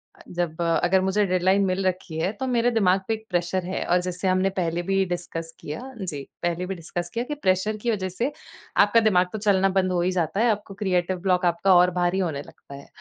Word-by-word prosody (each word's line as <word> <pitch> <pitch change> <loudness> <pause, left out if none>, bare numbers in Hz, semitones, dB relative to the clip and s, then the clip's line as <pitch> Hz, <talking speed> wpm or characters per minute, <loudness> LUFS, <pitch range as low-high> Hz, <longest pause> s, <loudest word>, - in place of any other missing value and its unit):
अ, - - -18
जब 175 -2 -3
अगर 175 +3 +2
मुझे 190 +2 +2
डेडलाइन 190 +1 +2
मिल 190 +1 -1
रखी 180 -3 -3
है 185 +5 0
तो 265 - -2
मेरे 245 -1 +2
दिमाग 195 -4 +3
पे 225 - +1
एक 220 0 -6
प्रेशर 175 0 -1
है 185 - -3
और 180 +1 +2
जैसे 180 +1 -3
हमने 185 +1 +2
पहले 170 0 -1
भी 195 0 +3
डिस्कस 165 -2 -5
किया 150 +9 -6 0.2
जी, 145 -7 -4 0.2
पहले 175 +1 -1
भी 195 - -4
डिस्कस 175 +1 -5
किया 235 - -1
कि 295 +2 -4
प्रेशर 200 -3 0
की 235 +3 -1
वजह 190 -4 -2
से, 235 +10 -2 0.5
आपका 205 +3 +5
दिमाग 190 -5 +3
तो 215 - -2
चलना 195 -2 +3
बंद 185 0 0
हो 175 -1 +1
ही 180 - +1
जाता 175 +1 -1
है। 240 - +4
आपको 205 -1 -4
क्रिएटर 185 -1 +1
ब्लॉक 180 -1 +2
आपका 175 +2 +3
और 180 +1 +5
भारी 175 +1 0
होने 160 -7 -1
लगता 140 - -13
है। 140 - -12
185 Hz, 230 wpm, -24 LUFS, 175-195 Hz, 0.5 s, आपका